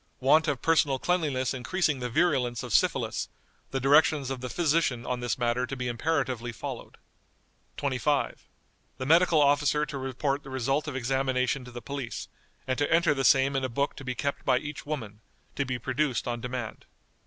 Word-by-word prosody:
Want 150 +5 +4
of 140 -3 -1
personal 155 -4 +3
cleanliness 145 -6 0
increasing 140 +3 0
the 125 0 -3
virulence 125 -5 +1
of - - -5
syphilis, - - +1 0.4
the 135 - -2
directions 140 0 +4
of 130 -2 -4
the 130 - -4
physician 150 -7 +1
on 125 -1 -2
this 120 -2 -2
matter 120 +1 0
to 135 - -4
be 125 -1 -3
imperatively 125 -2 -1
followed." 115 - -7 0.8
"25. 140 +1 -1 0.5
The 130 - -4
medical 165 +2 +5
officer 145 +1 +3
to 145 -2 -6
report 135 +2 -2
the 135 - -11
result 135 +3 -1
of 145 - -4
examination 130 0 0
to 125 - -10
the 120 0 -8
police, 140 -4 -5 0.4
and 130 +1 -1
to 145 - 0
enter 165 -2 +4
the 135 -1 -2
same 135 +1 +4
in 135 - 0
a 130 - -1
book 140 +4 -1
to 140 - -8
be 130 -1 -3
kept 140 +3 -2
by 130 -2 +3
each 145 +2 -6
woman, 110 -9 -5 0.3
to 140 - 0
be 125 -1 -1
produced 130 0 -1
on 120 -1 -2
demand." 125 -2 -5
135 Hz, 185 wpm, -28 LUFS, 125-145 Hz, 0.8 s, medical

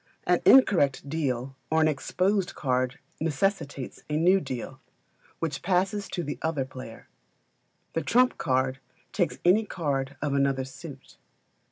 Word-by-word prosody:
An - - +3
incorrect 155 - +5
deal 135 -4 -2
or 160 - +2
an 155 - +4
exposed 185 +6 0
card 130 -1 0 0.2
necessitates 150 -3 -2
a 150 - 0
new 180 +4 +4
deal, 130 -3 -6 0.6
which 155 -4 -3
passes 195 +3 0
to 175 - -3
the 145 -1 -5
other 155 -5 -1
player. 130 -3 -10 0.9
A 165 - 0
trump 250 +6 +3
card 130 0 0 0.3
takes 180 -4 0
any 195 +5 +5
card 140 -8 -3
of 145 -1 -1
another 140 -1 +1
suit. 130 - -11
150 Hz, 135 wpm, -27 LUFS, 135-180 Hz, 0.9 s, incorrect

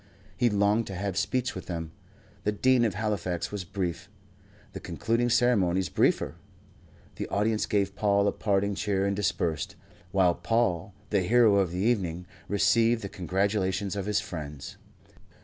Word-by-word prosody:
He 120 -1 +2
longed 105 +2 +2
to 95 - -6
have 100 0 -3
speech 120 +6 0
with 95 - -8
them, 80 -3 -4 0.5
The 105 - +1
Dean 125 +3 +3
of 105 -5 -1
Halifax 100 -5 -2
was 105 -2 -4
brief, 90 -2 -4 0.6
the - - -6
concluding 115 +2 -1
ceremonies 95 -8 +2
briefer. - - +1 0.8
The - - -3
audience 105 +1 0
gave 100 -2 0
Paul 100 -1 +2
a - - +3
parting 100 -1 0
cheer 100 -1 0
and 100 0 0
dispersed, 85 -5 -1 0.4
while 95 -3 +4
Paul, 95 0 0 0.2
the 100 -2 +3
hero 110 +1 +4
of 95 -3 +2
the 90 - -5
evening, 90 -5 0 0.2
received 115 +3 +3
the 100 - -4
congratulations 95 +1 -1
of 100 -1 -3
his 105 0 +2
friends. 75 -8 -7
100 Hz, 150 wpm, -28 LUFS, 90-105 Hz, 0.8 s, while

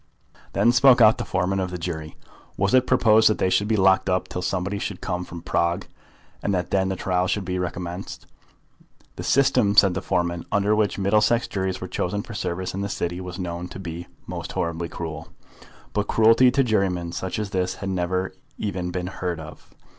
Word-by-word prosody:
Then 120 - +4
spoke 125 +1 +6
out 110 -1 +6
the - - -3
foreman 95 +1 0
of 95 -1 -1
the 90 - -5
jury. 80 -3 -5 0.4
Was 100 0 +1
it 130 0 +4
proposed 110 -4 +5
that 110 - +1
they 95 - +1
should 105 - +2
be 110 - +2
locked 95 0 +4
up 90 0 0
till 90 - -5
somebody 95 +2 -2
should 100 -2 -4
come 90 -1 -3
from 85 -1 -9
Prague, 85 +1 0 0.6
and 100 - 0
that 90 - -2
then 95 -1 +2
the 95 - -1
trial 90 0 0
should 100 +1 -1
be 90 0 -2
recommenced? 90 +1 -5 0.9
The - - -6
system, 125 -6 +3
said 100 -3 +7
the - - -3
foreman, 85 -1 -1
under 100 +1 +2
which 105 -1 +1
Middlesex 105 +4 +2
juries 95 -1 -3
were 95 - -4
chosen 100 +3 -2
for 115 - -9
service 95 -3 -3
in 95 - -3
the 100 - -2
City 85 -1 -3
was 90 -1 -7
known 90 -1 -4
to 90 - -9
be 85 -1 -6 0.2
most - - -6
horribly 85 0 -2
cruel; 80 -3 -6 0.7
but 105 0 0
cruelty 115 +3 +5
to 135 +2 +2
jurymen 95 -7 0
such 95 +1 -4
as 105 -2 -3
this 95 -2 -1
had 100 - -5
never 95 +1 -1 0.2
even 90 -4 -3
been 90 0 -3
heard 90 -2 -4
of. 80 -1 -11
95 Hz, 200 wpm, -24 LUFS, 90-105 Hz, 0.9 s, said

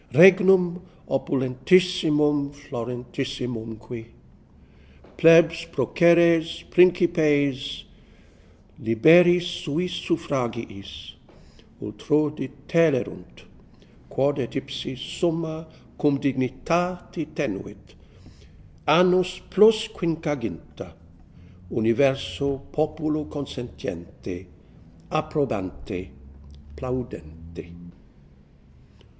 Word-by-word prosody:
Regnum 185 +2 +6 0.3
opulentissimum 150 +2 +1
fl.orentissimum.que 125 -3 -6 1.1
Plebs, 165 0 +5
proceres, 170 -1 +3
principes, 155 -6 +2 0.9
Liberia 165 +11 +5
suis 175 -1 -3
suffragiis 120 - -4 0.7
Ultr6 145 +8 -1
detulerunt, 145 +1 -1 0.6
Quod 140 +2 0
et 120 - -4
ipse 135 -1 -5
summa 160 +2 -3 0.3
cum 145 -2 +2
dignitate 165 +6 -2
tenuit, - - -6 0.9
Annos 180 +3 +4
plus 215 +2 +5
quinquaginta, 150 - -5 0.7
Universe 135 +4 0
populo 155 0 -1
consentiente, 95 - -8 0.6
approbante, 110 - -3 0.7
plaudente. 85 -10 -7
145 Hz, 55 wpm, -24 LUFS, 125-170 Hz, 1.1 s, Regnum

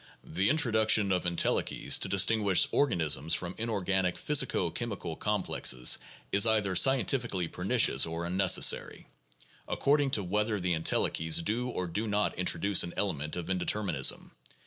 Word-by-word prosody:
The 95 +5 -1
introduction 110 -8 +2
of 90 -1 -1
entelechies 85 -1 0
to - - -1
distinguish 100 -1 +3
organisms 80 - 0
from 90 0 -5
inorganic 95 -5 -2
physico 135 - 0
chemical 100 -8 -6
complexes 90 - +1 0.3
is 100 +3 +4
either 105 -4 0
scientifically 120 -6 +2
pernicious - - +1
or 85 +1 -5
unnecessary, 95 +1 +1 0.6
according 145 0 0
to 100 - -4
whether 105 +3 -2
the 90 -1 -1
entelechies 80 0 0
do 120 +4 -1
or 90 -7 -4
do 105 +6 -4
not 105 0 -1
introduce 90 +2 +2
an 85 - -5
element 75 -7 -3
of 90 -2 -5
indeterminism. 90 -5 -1
95 Hz, 130 wpm, -29 LUFS, 85-110 Hz, 0.6 s, is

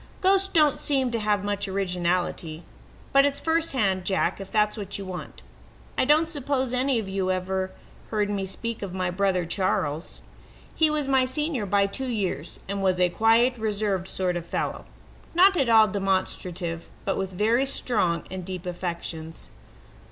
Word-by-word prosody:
"Ghosts 390 0 +4
don't 305 -6 +3
seem 265 -4 +1
to 230 - -1
have 210 -2 +1
much 205 0 -1
originality. 180 -3 -1 0.5
But 275 0 +7
it's 285 0 +1
firsthand, 260 - +1
Jack, 190 +1 0
if 195 - -9
that's 210 -1 +2
what 200 -2 -4
you 200 - -6
want. 185 -1 -8 0.5
I - - +2
don't 305 +4 +4
suppose 275 -5 -1
any 255 0 +2
of 220 -3 -2
you 190 -1 -1
have 185 -1 0
ever 190 0 -2 0.4
heard 210 -2 +1
me 200 -2 -2
speak 230 +4 -5
of 190 -2 -5
my 185 -1 -1
brother, 185 -1 +1
Charles. 165 -3 -1 0.5
He 315 -1 +3
was 300 -2 -1
my 265 -1 +4
senior 265 -4 -2
by 200 +1 +3
two 260 +7 -3
years, 185 - -3
and 200 +1 -3
was 185 -1 +2
a 180 -1 +4
quiet, 225 +6 +4
reserved 205 -4 -1
sort 185 -2 -1
of 175 - -3
fellow 170 - -3 0.5
not 380 +2 +6
at 275 -8 +2
all 220 -1 +7
demonstrative, 185 -3 -2 0.2
but 195 - 0
with 190 -1 -2
very 225 +8 +2
strong 205 -11 0
and 185 -1 -5
deep 185 0 -6
affections. 170 -2 -5
200 Hz, 170 wpm, -26 LUFS, 185-255 Hz, 0.5 s, But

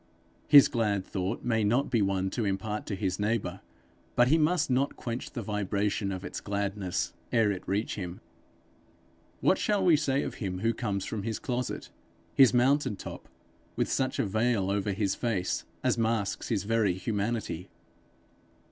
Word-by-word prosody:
His 145 -2 +9
glad 105 -5 0
thought 95 +3 -3
may 115 -2 +1
not 120 +7 +1
be 115 -4 +3
one 95 -1 0
to 120 - -1
impart 105 +2 -2
to 100 - -2
his 95 -1 -2
neighbour, 105 -3 -1 0.5
but 120 +1 +5
he 160 - +5
must 155 +1 +2
not 135 +2 +1
quench 120 0 -5
the 120 -5 -5
vibration 100 0 -1
of 95 0 -5
its - - -5
gladness 100 -4 -2 0.2
ere 115 -4 +3
it 95 -2 -4
reach 105 +3 -1
him. 90 -2 -5 1.2
What - - +3
shall 205 -3 +1
we 170 -3 +7
say 140 -2 +1
of - - -4
him 95 -2 -3
who 115 +2 +2
comes 100 -5 -2
from 110 - -3
his 110 +1 -2
closet, 125 -1 -3 0.4
his 135 -3 +7
mountain 130 -1 +3
top, - - -9 0.5
with - - 0
such 130 0 0
a - - +1
veil 110 -1 +1
over 100 0 0
his 100 -1 0
face 100 -7 -1 0.2
as - - +2
masks 110 -5 0
his 105 -5 0
very 110 -3 +2
humanity? 100 -2 -2
105 Hz, 165 wpm, -29 LUFS, 100-120 Hz, 1.2 s, His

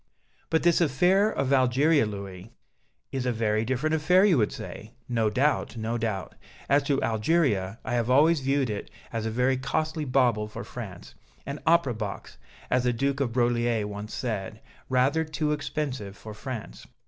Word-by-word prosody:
"But 160 - +1
this 175 0 +4
affair 180 +8 +3
of 135 -8 0
Algeria, 135 +2 +3
Louis 100 -1 -7 0.3
" - - -46
"Is 130 -2 -2
a - - +2
very 110 -1 0
different 130 +6 -1
affair 180 +5 +4
you 195 -5 +5
would 105 - +2
say. 110 +3 -8
No 115 -3 +1
doubt, 130 +2 0
no 110 +1 -2
doubt. 110 -5 -3 0.3
As 140 +1 +4
to 140 -1 +2
Algeria, 110 - +1
I - - -2
have 120 -1 0
always 150 +5 +5
viewed 135 -2 0
it 100 - -5 0.2
as 115 -1 -2
a - - 0
very 125 +3 +1
costly 155 +4 -2
bauble 125 -5 +2
for 105 - -7
France, - - -9 0.3
'an 140 +1 -5
opera 165 -6 +4
box' 105 -3 -6 0.3
as 125 0 +3
the 125 - +2
Duke 135 +3 -1
of 135 -4 0
Broglie 120 -2 +1
once 105 +1 -6
said, 110 -3 -4 0.3
'rather 130 +5 +2
too 155 -1 -2
expensive 135 -9 -3
for 110 - -9
France.'" 105 - -7
125 Hz, 170 wpm, -27 LUFS, 110-145 Hz, 0.3 s, you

